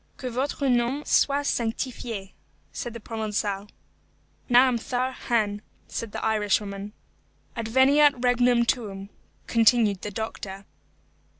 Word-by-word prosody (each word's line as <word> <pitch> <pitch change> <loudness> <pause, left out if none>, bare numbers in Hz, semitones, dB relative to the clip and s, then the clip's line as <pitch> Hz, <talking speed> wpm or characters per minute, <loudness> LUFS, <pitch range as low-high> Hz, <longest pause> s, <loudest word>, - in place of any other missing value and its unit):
"Que 255 -2 -5
votre 275 +3 -1
nom 250 +3 +1
soit 285 0 +2
sanctifié," 230 -4 -3 0.4
said 240 - -5
the - - -6
Provençal. 210 -2 -3 0.8
"Naomhthar 250 +1 +3
hainm," 210 -3 +1 0.3
said 230 -2 -5
the - - -4
Irishwoman. 205 -1 -1 0.6
"Adveniat 265 +6 +4
regnum 245 -1 +3
tuum," 200 -5 -2 0.4
continued 225 -4 +3
the 210 - -4
doctor. 200 -2 -6
230 Hz, 100 wpm, -25 LUFS, 210-250 Hz, 0.8 s, Adveniat